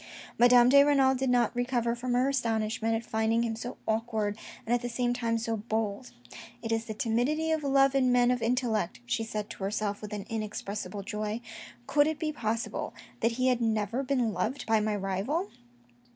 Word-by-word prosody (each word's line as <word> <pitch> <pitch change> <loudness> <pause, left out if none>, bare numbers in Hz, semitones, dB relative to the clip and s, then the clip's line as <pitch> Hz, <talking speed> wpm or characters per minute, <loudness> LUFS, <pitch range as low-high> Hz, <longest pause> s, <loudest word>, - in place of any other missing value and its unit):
Madame 245 0 +7
de 280 +2 +7
Renal 275 -2 +4
did 265 0 -1
not 245 -1 +2
recover 245 -1 0
from 245 +1 -3
her 250 +2 +3
astonishment 225 -3 0
at 225 +1 -3
finding 220 +1 +1
him 225 -1 -2
so 240 +3 -6
awkward 220 -2 -1 0.3
and 235 - 0
at 245 - +2
the 245 - -3
same 245 +1 0
time 230 -2 0
so 230 0 -2
bold. 220 +2 -3 0.3
" 240 +1 -15
It 225 - -3
is 225 0 0
the 220 - -6
timidity 255 +9 0
of 315 -1 0
love 275 -1 +4
in 260 -2 +3
men 245 0 +4
of 250 -1 0
intellect," 230 - 0
she 120 - -1
said 215 -2 -4
to - - -8
herself 205 0 -2
with 210 - -7
an 205 -2 -5
inexpressible 210 -2 -4
joy. 210 +2 -3 0.3
" 240 - -19
Could 290 +3 +3
it 315 -1 -1
be 310 0 -2
possible 225 -3 -3 0.2
that 230 +1 +1
he 255 +2 +1
had 250 -1 +1
never 220 +2 0
been 255 -5 0
loved 215 +9 -2
by 225 -1 +3
my 210 0 0
rival 205 - -2
230 Hz, 200 wpm, -29 LUFS, 220-250 Hz, 0.3 s, Madame